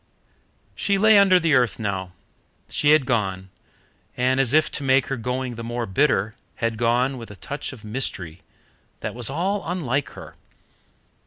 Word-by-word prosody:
She 200 -1 0
lay 215 +1 +6
under 190 -2 +5
the 165 -3 +1
earth 125 -4 +3
now. 95 -4 -4 0.6
She 145 - +1
had 150 -3 +5
gone, 95 -6 -2 0.7
and 130 +1 +2
as 130 -3 +3
if 155 +1 +3
to 145 - -3
make 135 0 +3
her - - 0
going 125 +1 -3
the 115 0 -7
more 120 +1 -3
bitter, 110 -1 +1 0.2
had 115 -1 -2
gone 125 +3 +1
with 115 - -9
a 105 - -10
touch 145 +8 -6
of 125 -5 -12
mystery 100 -7 -4 0.6
that - - -4
was 120 -1 -1
all 190 +8 -1
unlike 145 -6 -2
her. - - -10
125 Hz, 165 wpm, -23 LUFS, 110-150 Hz, 0.7 s, lay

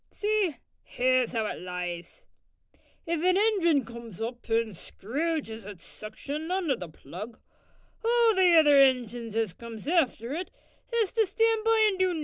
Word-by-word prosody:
See, 415 - 0 0.2
here's 255 -1 +1
'ow 220 -1 0
it - - -5
lies. 180 - -6 0.8
If 335 -1 -1
an 365 +1 +4
ingin 355 - +3
comes 235 -4 -10
up 240 +2 -6
an 225 0 +2
screwges 245 - -4
its 200 -3 -10
suction 285 +9 -7
on 370 -3 -1
to 270 - +3
the 180 -7 -8
plug, 185 - -10 0.6
all 465 0 +4
the 370 -3 +5
other 295 -3 +6
ingins 240 -4 +1
as 225 -5 0
comes 230 +3 -10
after 275 -7 +1
it 355 +4 -4 0.4
has 455 -5 +1
to 445 -3 +2
stan' 450 +2 +1
by 445 -1 +4
an' 385 -3 -1
do 370 -1 +2
nuffin. - - -3
275 Hz, 160 wpm, -28 LUFS, 225-375 Hz, 0.8 s, other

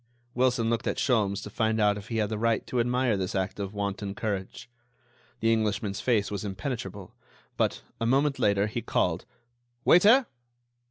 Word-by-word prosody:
Wilson 125 -2 +2
looked 115 0 -1
at - - -1
Sholmes 105 -6 +1
to - - -8
find 110 0 0
out 105 -1 +3
if 105 +1 -9
he 115 - -3
had 105 -2 +1
the 110 - -2
right 115 0 +1
to 125 - -2
admire 125 -1 +1
this 95 -1 -3
act 95 +2 -2
of 100 +1 -4
wanton 100 0 -3
courage. 100 +3 -4 0.7
The 115 0 +3
Englishman's 105 -2 -1
face 110 -6 +1
was 100 -1 -3
impenetrable; 105 +5 -5 0.4
but, - - 0 0.2
a 115 - 0
moment 135 +2 +2
later, 100 -3 +3
he 110 +3 -3
called: 90 -6 0 0.6
"Waiter!" 220 +9 +6
110 Hz, 170 wpm, -27 LUFS, 100-120 Hz, 0.7 s, Waiter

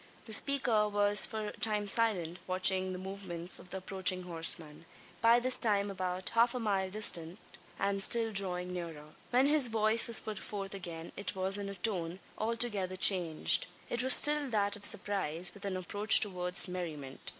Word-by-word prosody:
The 220 - -5
speaker 230 -4 0
was 205 0 +4
for 215 -1 -6
a - - -14
time 210 -2 -2
silent, 190 -6 +3
watching 185 0 +2
the 185 - -7
movements 185 -2 -3
of 180 - -14
the 190 - -7
approaching 190 -1 0
horseman 165 -2 +1 0.4
by 230 +1 +3
this 255 +1 0
time 205 -3 -1
about 185 -1 -5
half 235 +2 0
a - - -4
mile 195 -4 -3
distant, 180 -4 0 0.4
and 200 0 -2
still 225 +2 +2
drawing 180 -3 -2
nearer. 160 -4 -9 0.2
When 250 +2 +1
his 290 -2 +3
voice 220 0 +4
was 235 - +5
put 215 -2 -7
forth 195 -2 -7
again 170 -4 -9
it 200 -1 -6
was 190 +2 0
in 200 -1 -7
a 200 - -9
tone 180 -3 -3 0.2
altogether 215 -4 0
changed. 180 -4 +2 0.2
It 240 - -3
was 260 0 +6
still 295 -2 +1
that 205 -3 -2
of 205 0 +3
surprise, 185 -5 0
with 200 0 -12
an 190 -2 -4
approach 205 +4 +4
towards 180 -2 +1
merriment. 155 -7 -8
195 Hz, 175 wpm, -30 LUFS, 180-215 Hz, 0.4 s, was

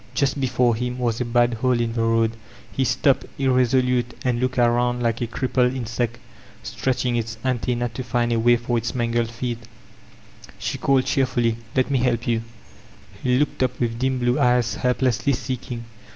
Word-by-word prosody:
Just 140 +2 +1
before 125 -2 +2
him 125 +2 -3
was 120 -1 -1
a - - 0
bad 120 0 +2
hole 125 +1 +1
in 115 -1 -1
the 115 - -1
road; 115 0 +2 0.4
he 135 - 0
stopped, 135 +2 +2
irresolute, 125 -2 +2
and 120 -2 +1
looked 130 +1 -1
around 120 0 +2
like 115 0 0
a 120 - 0
crippled 125 +1 0
insect 120 -1 -2 0.5
stretching 130 -2 -1
its 115 0 -3
anten* 125 -1 0
nc 120 -2 -2
to 130 - -4
find 120 0 0
a 115 - +1
way 120 +1 +5
for 120 0 -1
its - - -4
mangled 120 -1 0
feet 120 0 -4 1.0
She - - -3
called 135 -2 +2
cheer 135 -1 +2
ily, 115 -1 +2 0.2
''Let 130 +1 +1
me 135 - +2
help 120 -2 +1
you/' 115 -1 +1 0.8
He 125 -1 +2
looked 145 0 0
up 125 -1 0
with 115 -1 -1
dim 130 0 +1
blue 125 +2 +1
eyes 125 -3 +3
helplessly 125 +1 +1
seddng. 125 -1 -4
125 Hz, 180 wpm, -23 LUFS, 120-130 Hz, 1.0 s, way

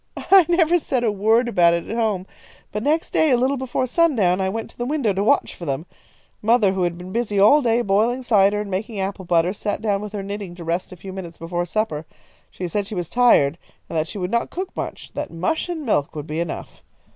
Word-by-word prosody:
"I 380 -4 +5
never 345 0 +4
said 255 -5 -1
a 225 - +2
word 220 +4 +2
about 170 -7 +4
it 170 - -4
at 225 - -4
home, 215 -5 0 0.5
but 210 - -3
next 305 +6 0
day, 315 - +3
a 255 - +5
little 255 +2 +2
while 280 - -1
before 255 - 0
sundown, 235 - +2
I 190 - 0
went 225 +3 -5
to - - -22
the 240 - -2
window 275 -8 0
to 195 +1 -1
watch 215 - +2
for 170 - -9
them. 140 +4 -2 0.6
Mother, 220 -2 +4
who 190 - -2
had 175 -1 0
been 180 +1 -9
busy 210 -2 -1
all 250 +10 +6
day, 235 -1 +2
boiling 225 +6 +1
cider 205 -3 +3
and 205 -1 -5
making 205 +3 -3
apple 190 0 -3
butter, 170 +1 +2
sat 205 0 -3
down 205 -2 0
with 210 0 -7
her 200 -2 -4
knitting 200 -3 -6
to 175 - -9
rest 170 +3 -2
a - - -8
few 190 +2 -9
minutes 175 -3 -8
before 175 +1 -3
supper. 160 -6 -2 0.4
She 180 - -5
said 200 +3 -2
she 210 - -6
was 175 -3 -4
tired, 175 -11 +4 0.3
and - - -7
that 160 0 0
she 205 - -7
would 180 0 -3
not 235 - 0
cook 375 +2 -5
much; - - -6
that - - -4
mush 185 - -2
and 320 -4 -4
milk 145 - 0
would 150 -1 -5
be 155 +1 -4
enough. 170 -2 -5
205 Hz, 245 wpm, -22 LUFS, 180-240 Hz, 0.6 s, all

